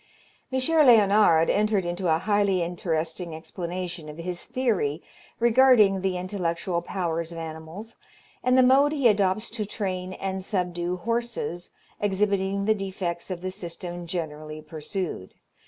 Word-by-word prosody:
M. 260 - +1
Léonard 215 - +5
entered 210 -2 +1
into 175 +1 -2
a 160 - +4
highly 200 -1 +1
interesting 170 -1 -3
explanation 175 -1 -5
of 150 - -9
his 175 +1 -4
theory 205 - 0 0.4
regarding 230 -5 +5
the 190 -1 0
intellectual 180 -2 -2
powers 170 -2 -3
of 170 - -8
animals, 165 +7 -8 0.5
and 255 +1 +3
the 260 - +7
mode 275 +4 +5
he 280 -5 +3
adopts 205 0 +2
to 225 -2 -3
train 185 -3 -4
and 190 0 -4
subdue 180 -2 -2
horses, 230 -5 -3 0.3
exhibiting 200 -1 0
the 220 - +4
defects 190 -4 -4
of 180 -2 -4
the 185 0 -3
system 175 -2 -6
generally 155 -3 -5
pursued. 155 - -5
185 Hz, 135 wpm, -26 LUFS, 170-210 Hz, 0.5 s, the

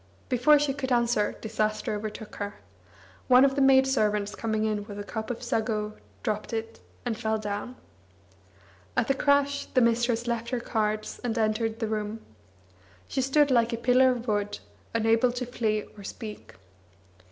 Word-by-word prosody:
Before 255 +4 +5
she 285 -1 +1
could 265 -2 -4
answer 235 -3 +2
disaster 215 -1 -1
overtook 210 +1 -6
her. 205 0 -4 0.7
One 255 +1 +7
of 270 - +2
the 280 - 0
maidservants 265 -7 +3
coming 220 -1 -1
in 210 -1 -1
with 205 -1 -8
a 205 - -4
cup 220 +1 -5
of 245 0 -4
sago 215 -3 -1 0.3
dropped 215 +1 -2
it, 225 0 -4 0.3
and 240 -2 -1
fell 220 -1 -1
down. 210 +3 -4 1.2
At - - +2
the - - +5
crash 285 0 +2
the 255 - +2
mistress 235 0 +2
left 235 -1 -2
her 250 -1 -1
cards, 215 -2 -2
and 235 -1 -1
entered 220 0 0
the 225 -1 -2
room. 215 0 -3 0.9
She 265 - -1
stood 280 +2 +3
like 235 -1 +3
a - - -1
pillar 255 +2 +4
of 245 -1 -2
wood, 205 -1 0 0.4
unable 225 +2 +3
to 250 0 -3
flee 220 -3 -1
or 205 - -11
speak. 210 - -8
225 Hz, 165 wpm, -27 LUFS, 215-250 Hz, 1.2 s, One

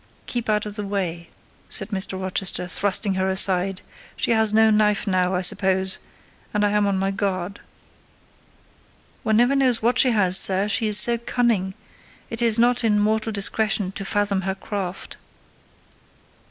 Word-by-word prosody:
"Keep 240 -2 -4
out 210 0 0
of 210 0 -3
the 210 - -4
way," 180 -4 -5 0.4
said 195 - -1
Mr. 190 -2 -3
Rochester, 185 -1 -2
thrusting 200 +2 0
her 190 0 -2
aside: 190 0 +1 0.3
"she - - -2
has 220 -2 +3
no 220 0 +3
knife 210 0 +1
now, 185 -2 -1
I 180 - -1
suppose, 190 +1 +1 0.6
and 210 0 +1
I'm 205 0 0
on 195 -1 -1
my 195 +1 -2
guard." 195 -1 -4 1.6
"One 220 0 0
never 245 +4 +2
knows 255 -5 +1
what 245 +2 +1
she 260 - +4
has, 190 -5 +4
sir: 195 +1 +5
she 215 +2 +1
is 210 -1 +5
so 235 +2 +4
cunning: 225 -6 -2 0.6
it 230 0 -5
is 230 -2 +2
not 240 +1 +1
in 210 -2 +1
mortal 220 +1 -1
discretion 205 -1 0
to 195 - -7
fathom 200 -1 -1
her 190 0 -4
craft." 195 -2 -7
205 Hz, 160 wpm, -21 LUFS, 190-220 Hz, 1.6 s, sir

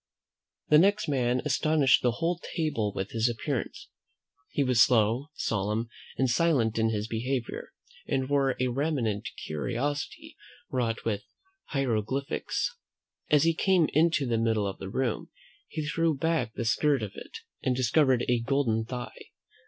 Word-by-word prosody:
The 150 - +7
next 205 +4 +3
man 125 -3 +1
astonished 150 -1 +3
the 120 -2 +2
whole 170 +5 -1
table 150 - 0
with 95 0 -4
his 115 +1 +1
appearance. 115 -2 -4 0.6
He 145 - 0
was 125 -3 +3
slow, 115 +3 +3
solemn, 110 +2 -1 0.3
and 130 - +2
silent 125 -5 +2
in 110 0 +3
his 105 -1 -2
behaviour, 120 +2 -3 0.4
and 130 -1 0
wore 140 -2 +2
a 130 0 +1
raiment 125 -6 -1 0.2
curiously 125 - -3 0.4
wrought 115 -3 -1
with 105 -3 -1 0.4
hieroglyphics. 135 -1 -1 0.5
As 150 -2 +5
he 165 0 +4
came 180 -1 +3
into 160 -2 +3
the 115 -2 0
middle 110 -2 +1
of 95 - -4
the 95 - -6
room, 125 +2 -2 0.4
he 155 -2 -4
threw 165 -1 +1
back 155 -7 0
the 120 - -3
skirt 140 +2 +2
of 105 - -4
it, - - -9 0.2
and 130 -2 +1
discovered 130 0 +3
a 125 -1 +2
golden 115 -3 0
thigh. 125 +1 -7
125 Hz, 145 wpm, -28 LUFS, 115-145 Hz, 0.6 s, The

